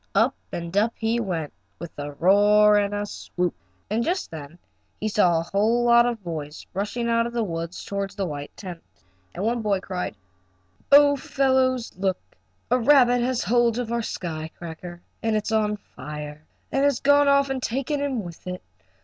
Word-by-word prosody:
Up - - +4 0.2
and 170 +1 -5
up 220 +3 +3
he 225 +1 0
went, 170 -9 -3 0.2
with 170 -1 -8
a 145 0 -5
roar 205 +5 +5
and 205 -1 +2
a 205 0 -2
swoop, 180 -3 -3 0.3
and 220 +3 0
just 360 +6 -2
then 155 +1 -9 0.4
he 215 - -1
saw 185 -5 +3
a - - -2
whole 215 +7 +1
lot 235 0 +6
of 230 -4 -3
boys 155 -3 -6
rushing 210 +5 -2
out 230 0 +2
of 235 - -8
the 235 -1 0
woods 165 -2 -5
toward 200 -1 -3
the 195 0 -3
white 145 -3 -5
tent. 180 -4 -8 0.5
And 180 - -3
one 235 +1 0
boy 205 -3 +1
cried: 185 - -4 0.8
"Oh, 285 0 +8
fellows, 260 -2 +1
look! 190 -1 0 0.5
A 250 - +4
rabbit 245 -1 +5
has 250 0 0
hold 240 0 +2
of 240 -2 -3
our 235 0 0
sky 160 -7 -4
cracker 175 +1 -9 0.2
and 225 -1 0
it's 215 +1 -1
on 210 -1 +1
fire 150 -4 -9 0.2
and 270 - +1
has 285 -3 +2
gone 285 +1 +4
off 280 -1 +4
and 265 -1 -2
taken 270 +5 -1
him 265 -6 -1
with 175 0 -10
it! 180 0 -5
210 Hz, 185 wpm, -24 LUFS, 175-240 Hz, 0.8 s, Oh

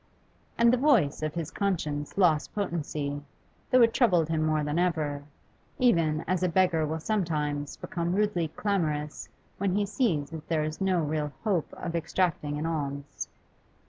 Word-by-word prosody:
And 235 +1 +5
the - - +4
voice 235 - +3
of 155 0 -2
his 165 -1 -3
conscience 155 -8 -2
lost 165 -6 +3
potency, 150 -7 -2 0.5
though 255 -1 +6
it 230 0 +4
troubled 180 - +3
him 160 -1 +1
more 155 -1 +1
than 150 +3 0
ever, 150 -5 0 0.5
even 165 -11 +3
as 185 +1 +1
a 180 - +2
beggar 170 -3 +2
will 160 +2 -2
sometimes 150 -7 -1
become 170 +1 -2
rudely 205 -5 +1
clamorous 155 -5 -2 0.3
when 195 -1 +1
he 205 0 +2
sees 195 - 0
that 160 -2 -8
there 160 -2 +1
is 155 +2 -4
no 185 -3 +2
real 150 -1 -1
hope 195 -8 0
of 170 -1 -5
extracting 165 -3 0
an 150 - -3
alms. 140 -3 -3
165 Hz, 160 wpm, -28 LUFS, 150-190 Hz, 0.5 s, though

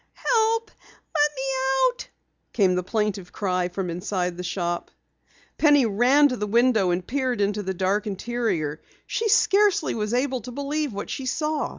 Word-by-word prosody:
"Help! 450 -1 +1 0.4
Let 295 -1 +3
me 265 - -4 0.5
out!" - - -10 0.5
came 190 -4 +3
the 180 - 0
plaintive 200 -1 -2
cry 185 -3 -1
from 180 -1 -4
inside 180 0 -2
the 180 - -6
shop. 175 -1 -3 0.7
Penny 290 -4 +5
ran 245 +7 +4
to 250 - -3
the 210 - -3
window 230 -3 +3
and 175 +1 -1
peered 255 -3 -1
into 205 +1 0
the 190 -1 -4
dark 195 +4 0
interior. 195 -8 -2 0.2
She 450 -1 -1
scarcely 400 -4 +3
was 215 +1 -2
able 260 0 0
to 250 - -8
believe 285 +2 -2
what 200 0 -6
she 265 - -4
saw. 305 +3 -1
225 Hz, 165 wpm, -24 LUFS, 185-285 Hz, 0.7 s, Penny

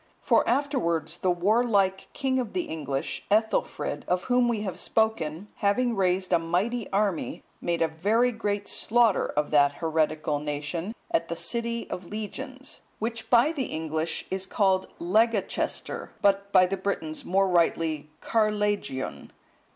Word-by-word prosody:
For - - +3
afterwards 170 - 0
the 185 - +1
warlike 195 +1 +2
king 265 -2 0
of 245 - -3
the 360 - 0
English, 140 - -3
Ethelfrid,(170) 220 +2 0
of 180 +1 +1
whom 245 -1 +3
we 230 -3 0
have 190 -3 -4
spoken, 205 -5 0
having 230 +4 +1
raised 185 -1 +1
a 170 - +5
mighty 190 +8 -1
army, 200 -4 -1 0.2
made 170 -1 0
a - - +3
very 210 +10 +2
great 205 -3 -2
slaughter 230 -2 +3
of 150 0 -1
that 145 -1 +5
heretical 155 -1 0
nation, 150 +7 -4 0.2
at 330 - +1
the 170 - -3
city 235 +4 -2
of 180 -1 -5
Legions,(171) 260 +6 -6 0.2
which 225 +1 -4
by 245 +5 +5
the 280 -6 -2
English 160 0 -3
is 190 0 -2
called 190 -2 +2
Legacaestir, 215 +4 0
but 200 0 +2
by 185 -2 +6
the 195 +2 -2
Britons 160 -6 -3
more 195 +2 +2
rightly 165 -4 +1
Carlegion. 205 - -1
195 Hz, 145 wpm, -27 LUFS, 165-225 Hz, 0.2 s, by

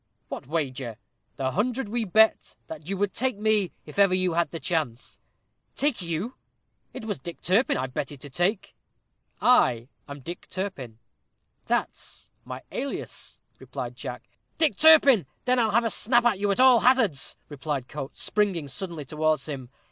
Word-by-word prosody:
"What - - -7
wager?" 130 -7 -3 0.4
"The 130 -1 -1
hundred 240 - -1
we 230 +2 -1
bet 220 +3 +3
that 160 +1 -9
you 195 - -2
would 200 0 0
take 255 -3 -1
me 210 -3 +2
if 150 +6 -7
ever 195 -2 +5
you 185 -2 +1
had 170 +1 +1
the 165 - -6
chance." 155 -10 -3 0.6
"Take 285 -7 0
you! 175 +8 -3 0.6
it - - -8
was 205 -3 -3
Dick 170 -1 -8
Turpin 200 +9 +2
I 130 - -1
betted 140 +2 -5
to 145 - -8
take." 180 - -1 0.7
"I 125 - +4 0.2
am 140 0 -8
DICK 170 +6 -8
TURPIN 140 - -5 0.7
that's - - -3
my 130 +1 -7
alias!" 275 +2 -6 0.2
replied - - -6
Jack. - - -7 0.3
"Dick 315 -2 +2
Turpin! 285 - +6 0.2
then 255 0 +3
I'll 225 -2 +3
have 230 +3 +2
a 225 - +1
snap 240 +2 +3
at 220 -5 +3
you 205 0 0
at 200 - 0
all 255 -2 +7
hazards," 230 - +2 0.3
cried 140 -5 -2
Coates, 145 -2 -6
springing 195 -8 0
suddenly 170 -1 -5
towards 155 0 0
him. 135 -5 -6
185 Hz, 165 wpm, -26 LUFS, 145-225 Hz, 0.7 s, all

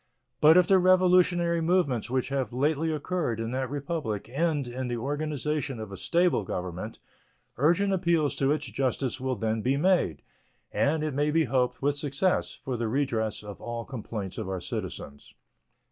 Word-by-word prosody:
But 160 +3 +7
if 180 - +6
the 190 +1 +5
revolutionary 180 -2 +4
movements 160 - +1
which 130 +1 0
have 135 -5 -1
lately 150 +5 +1
occurred 155 -6 -2
in 115 0 -3
that 130 0 -2
Republic 140 -6 -3
end 145 0 0
in 125 +1 -4
the 120 -1 -2
organization 145 0 -2
of 110 -2 -7
a - - -6
stable 170 - +2
government, 90 +3 -5 0.6
urgent 175 - +3
appeals 170 -5 +1
to 135 0 +2
its 150 0 0
justice 130 +2 -2
will 130 -1 -1
then 110 0 -1
be 130 +5 +1
made, 175 - +2 0.5
and, 155 +2 +1
it 155 -2 -2
may 145 +2 +1
be 160 +2 +3
hoped, 130 -1 0
with 145 +1 +3
success, 145 +5 -1
for 130 -2 -2
the 115 -1 -1
redress 110 -4 -1
of 105 -1 -9
all 120 0 -5
complaints 110 -7 -6
of 105 -4 -4
our 95 -1 -2
citizens. 70 -4 -6
140 Hz, 170 wpm, -28 LUFS, 120-160 Hz, 0.6 s, But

